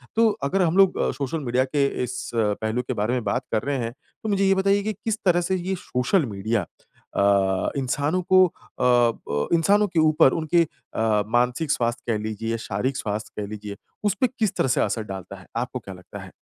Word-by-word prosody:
तो 225 0 +5
अगर 165 +8 +1
हम 175 0 +2
लोग 195 -1 +6 0.2
सोशल 145 +3 -3
मीडिया 130 -2 +1
के 140 +1 +1 0.2
इस 125 0 -5
पहलू 110 +1 0
के 125 +1 -4
बारे 110 +1 -1
में 125 -2 -1
बात 110 +5 -1
कर 110 -1 0
रहे 140 +1 -1
हैं। 115 -1 -3 0.3
तो 220 - -2
मुझे 195 -1 +2
ये 195 0 +4
बताइए 200 +1 +2
कि 215 +1 -1
किस 220 +2 -3
तरह 175 -1 +4
से 185 +2 0
ये 185 +1 -2
सोशल 145 +3 0
मीडिया 105 -1 -1 0.5
अ, 95 -1 +2
इंसानों 145 +6 0
को 185 0 +8
अ - - -14 0.3
प 120 -11 +2
इंसानों 200 +6 +4
के 175 -3 0
ऊपर 155 -4 +5
उनके 165 +1 +2
अ, 110 -8 -1
मानसिक 125 +6 +1
स्वास्थ 120 -2 0
कह 115 -2 +1
लीजिए, 110 +2 -3
शारीरिक 115 +5 -2
स्वास्थ 105 +1 -4
कह 105 - -3
लीजिए, 105 -1 -7 0.3
उसपे 210 +5 +2
किस 215 -4 +1
तरह - - +2
से 125 - +2
असर 110 - 0
डालता 95 -2 -7
है? 90 - -15
आपको 125 +2 -2
क्या 100 -4 -9
लगता 90 - -11
है? - - -12
125 Hz, 205 wpm, -24 LUFS, 110-175 Hz, 0.5 s, को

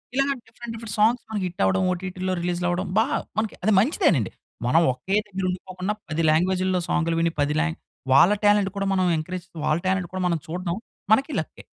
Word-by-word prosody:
ఇలాగ 275 +1 +2 0.2
different, 230 0 -8
different 225 -2 -6
songs 230 +3 +3
మనకి 210 -3 -2
hit 175 - -6
అవ్వడం 95 - +2
ఓటీటీలో 185 +1 -3
రిలీజ్‌లు 175 0 -1
అవ్వడం. 180 +2 -1
బా 220 - +5
అది - - -8
మనకి 215 -1 0
మంచిదేనండి. 205 - +2 0.4
మనం 160 +7 +4
ఒకే 190 +10 -2
దగ్గర 190 -2 -3
ఉండిపోకుండా 185 +2 -3 0.2
10 160 +1 -1
లాంగ్వేజ్‌‌లో 185 +3 +2
సాంగ్‌లు 165 -1 +1
విని 165 0 +1
10 145 +1 +1
లాం 165 -1 0 0.4
వాళ్ళ 170 +8 +7
టాలెంట్ 205 -1 +4
కూడా 195 0 -1
మనం 185 -1 +2
ఎంకరేజ్ 175 +3 -5 0.2
వాళ్ళ 155 - +2
టాలెంట్ 190 -1 +1
కూడా 185 -1 -2
మనం 170 -2 0
చూడ్డం 175 +1 -3 0.4
మనకి 270 +7 +4
లక్కే. - - -7
185 Hz, 185 wpm, -24 LUFS, 170-205 Hz, 0.4 s, వాళ్ళ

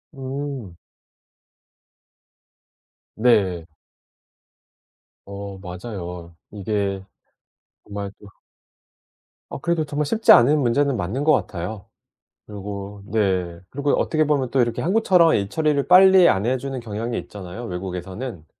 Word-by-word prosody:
음. 135 -7 -6 2.4
네. 100 -8 +2 1.6
어 100 0 -7
맞아요. 90 -2 -7 0.2
이게 100 -1 -2 0.8
정말 100 -1 -6
또 105 - -14 1.2
어 - - -6
그래도 165 +1 0
정말 145 +1 -2
쉽지 225 +9 +3
않은 145 +6 +5
문제는 140 +1 +1
맞는 100 +11 -2
것 155 - +4
같아요. 100 - -3 0.6
그리고 100 0 -7
네 95 -5 0
그리고 140 +1 -1
어떻게 155 -1 +1
보면 140 -4 0
또 135 - +3
이렇게 120 -1 -1
한국처럼 180 -3 +4
일 100 -1 0
처리를 150 -2 0
빨리 185 -1 +7
안 95 +2 +1
해 130 +2 +1
주는 135 0 -5
경향이 115 +1 -4
있잖아요 100 +4 -8
외국에서는. 95 +1 -6
110 Hz, 230 characters per minute, -22 LUFS, 95-140 Hz, 2.4 s, 빨리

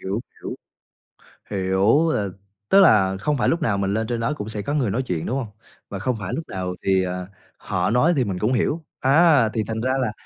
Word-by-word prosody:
Hiểu, 100 +4 -3 0.2
hiểu. - - -5 1.0
Hiểu, 100 - +2
là 100 -2 -1 0.4
tức 195 - +6
là 100 - +5
không 150 +6 0
phải 120 - +1
lúc 165 +1 0
nào 100 -7 +1
mình 100 0 0
lên 110 +1 -1
trên 120 -1 -2
đó 125 +6 0
cũng 105 -7 -6
sẽ 105 -2 -4
có 145 - -3
người 130 -8 +1
nói 120 +7 -1
chuyện, 90 -10 -3
đúng 130 - -1
hông? 125 -5 -4 0.4
Và 100 - -5
không 125 +5 -1
phải 100 - -5
lúc 160 - -5
nào 90 -1 -4
thì, 95 -1 +2
à, 90 0 -4 0.3
họ 90 +1 -2
nói 125 +9 +3
thì 130 - +2
mình 95 -4 -3
cũng 110 +6 0
hiểu. 150 +7 0 0.2
Á, 145 -3 +5
thì 110 0 -2
thành 110 +1 -3
ra 130 +3 0
là 110 -4 -1
110 Hz, 235 wpm, -22 LUFS, 95-130 Hz, 1.0 s, tức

